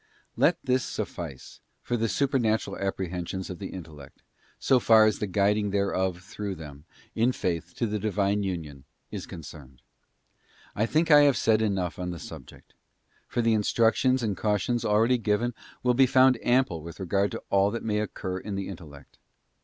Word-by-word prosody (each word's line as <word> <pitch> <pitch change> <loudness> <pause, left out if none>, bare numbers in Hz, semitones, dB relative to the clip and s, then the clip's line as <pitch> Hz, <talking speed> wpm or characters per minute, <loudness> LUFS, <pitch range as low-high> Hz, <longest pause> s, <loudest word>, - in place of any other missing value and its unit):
Let 165 +1 +3
this 130 -1 +1
suffice 75 -7 -6 0.2
for 120 - -1
the 115 -1 0
Supernatural 125 -6 0
Apprehensions 95 -1 -3
of 90 - -8
the 95 - -5
intellect, 80 -6 -11 0.3
so 130 - +3
far 110 -2 +6
as 110 - +1
the 105 - -2
guiding 100 +2 +1
thereof 95 -3 0
through 100 0 -5
them, 75 -3 -11 0.3
in 115 +3 +2
faith, 85 -6 -3
to 120 - -1
the 105 -1 -2
Divine 100 0 0
union, 80 -8 -5 0.3
is - - -6
concerned. 70 -5 -11 0.9
I 110 +2 +1
think 160 +4 +1
I 145 0 +9
have 140 -3 +4
said 110 -1 +3
enough 95 -5 -1
on 90 0 -3
the 85 - -5
subject: - - -12 0.5
for 120 - -1
the 115 0 +3
instructions 115 +4 +2
and 105 -3 -1
cautions 105 +4 0
already 115 +3 +3
given 115 +2 0 0.3
will 125 -1 +3
be 130 +2 +5
found 130 -1 +5
ample 120 -10 +2
with 85 +4 -10
regard 100 +2 +1
to - - -6
all 100 0 +4
that 115 +2 -4
may 105 -1 0
occur 95 -3 -4
in 100 +1 -5
the 100 -1 -4
intellect. 75 -7 -12
105 Hz, 170 wpm, -27 LUFS, 90-115 Hz, 0.9 s, I